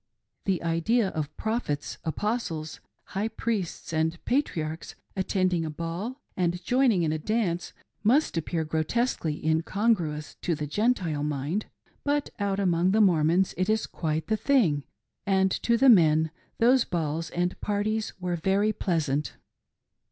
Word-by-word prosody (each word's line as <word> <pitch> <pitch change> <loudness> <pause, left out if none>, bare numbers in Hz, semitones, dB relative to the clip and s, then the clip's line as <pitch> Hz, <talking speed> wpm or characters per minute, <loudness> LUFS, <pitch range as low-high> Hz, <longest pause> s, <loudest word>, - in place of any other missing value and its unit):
The 190 -4 0
idea 190 +7 +2
of 150 -3 -4
Prophets, 220 -11 -2
Apostles, 165 -4 -2 0.3
High 200 +3 0
Priests, 215 -8 -3
and 160 +1 +1
Patriarchs 165 - -1 0.2
attending 185 -3 +1
a 160 - -3
ball 170 - -4 0.2
and 175 -1 -1
joining 245 -5 +3
in 155 - +1
a 155 - -2
dance 180 -2 -1 0.3
must 255 +6 +3
appear 165 0 -1
grotesquely 160 +1 -1
incongruous 160 -1 0
to 170 - 0
the 150 0 -3
Gentile 175 - 0
mind; 150 +7 -2 0.4
but 290 0 0
out 200 -1 0
among 180 -2 +2
the 220 - +3
Mormons 175 -1 +3
it 185 +3 0
is 220 0 +2
quite 155 -1 -2
the 220 - 0
thing; 195 - +2 0.4
and 190 -1 +3
to 235 0 +3
the 270 - +4
men 160 -8 +6 0.3
those 245 +2 +5
balls 165 -3 -2
and 175 +1 -2
parties 210 +1 -1
were 180 -1 -1
very 195 +5 +1
pleasant. 150 -7 -1
180 Hz, 135 wpm, -27 LUFS, 160-215 Hz, 0.4 s, men